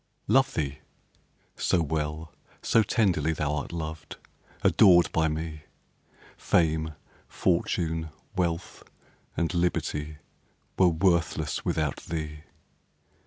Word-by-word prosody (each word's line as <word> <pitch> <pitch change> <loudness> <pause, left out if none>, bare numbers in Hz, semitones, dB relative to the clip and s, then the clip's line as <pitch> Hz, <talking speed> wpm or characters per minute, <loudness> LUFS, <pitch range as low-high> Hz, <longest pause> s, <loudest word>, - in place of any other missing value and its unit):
Love 130 0 +3
thee? 70 -2 -2 0.8
so 90 - +1
well, 80 +1 -3 0.3
so 115 - +4
tenderly 90 - +1
Thou'rt 75 -1 -2
loved, 80 -2 -6 0.5
adored 90 -2 +6
by 80 0 +2
me, 80 0 -4 0.7
Fame, 80 -1 +1 0.3
fortune, 80 -2 0 0.3
wealth, 85 -2 -2 0.6
and 85 +2 0
liberty, 75 -3 -1 0.6
Were 95 - +5
worthless 85 -3 +1
without 75 -3 -1
thee. 75 -2 -5
80 Hz, 90 wpm, -27 LUFS, 75-85 Hz, 0.8 s, adored